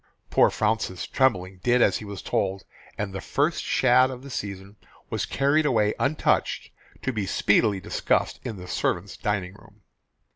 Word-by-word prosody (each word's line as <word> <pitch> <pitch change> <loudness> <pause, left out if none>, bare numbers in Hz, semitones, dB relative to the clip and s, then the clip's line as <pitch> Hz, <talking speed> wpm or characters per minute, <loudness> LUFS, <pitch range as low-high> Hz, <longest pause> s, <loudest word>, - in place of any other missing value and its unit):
Poor - - +5
Fraunces 105 -4 -1
tremblingly 95 -8 +1
did 125 +3 +3
as - - +4
he 110 - -8
was 100 -1 -7
told, 95 0 -1 0.3
and 100 -2 -3
the 95 - -5
first - - 0
shad 130 +1 +4
of 130 -1 -8
the 140 - -9
season 100 -2 -6 0.4
was - - -1
carried 140 +3 +2
away 110 -7 +2
untouched 145 +3 0 0.3
to 130 - -1
be 105 -4 -2
speedily 100 +1 +2
discussed 90 - 0
in 120 -4 -4
the 90 -1 -9
servants' 90 +2 -1
dining 100 -3 -2
room. 100 +1 -19
105 Hz, 160 wpm, -25 LUFS, 95-125 Hz, 0.4 s, Poor